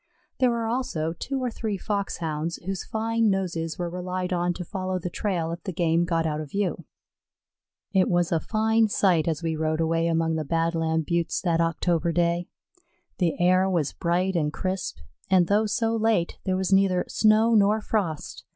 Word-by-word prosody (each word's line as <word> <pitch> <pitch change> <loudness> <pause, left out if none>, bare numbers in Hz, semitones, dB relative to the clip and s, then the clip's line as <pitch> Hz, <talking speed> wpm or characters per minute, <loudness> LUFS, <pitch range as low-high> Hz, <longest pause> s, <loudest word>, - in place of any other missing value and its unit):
There 255 - +4
were 235 -1 -1
also 225 -10 -2
two 270 +10 -4
or 250 - -1
three 220 -3 -3
Foxhounds, 170 -5 -2
whose 190 0 -3
fine 225 0 0
noses 170 -4 -2
were 175 - -2
relied 180 +1 -3
on 175 0 +1
to 180 - -6
follow 185 0 -3
the 180 0 -5
trail 175 -6 -2
if 170 - -6
the 190 - -4
game 170 0 +1
got 165 -1 0
out 155 -1 -1
of 150 - -8
view. 200 +1 -2 1.1
It 190 -2 +3
was 175 -1 +1
a 165 - +2
fine 220 +3 +2
sight 180 -6 +2
as 160 0 -1
we 165 -1 -1
rode 155 0 -1
away 165 +1 +1
among 165 -1 +1
the 155 - -1
Badland 165 0 0
Buttes 170 -1 0
that 170 -2 +1
October 170 0 +1
day. 170 +1 +1 0.7
The 175 -4 0
air 185 +2 +4
was 165 -6 0
bright 180 +2 0
and 150 -3 +1
crisp, 185 +3 -3 0.3
and 185 -2 +5
though 210 +4 +2
so 225 +2 0
late, 220 -6 +1
there 185 -1 +1
was 190 0 0
neither 190 -2 +3
snow 220 +1 +3
nor 210 0 +4
frost. 195 -8 -3
180 Hz, 180 wpm, -25 LUFS, 165-200 Hz, 1.1 s, and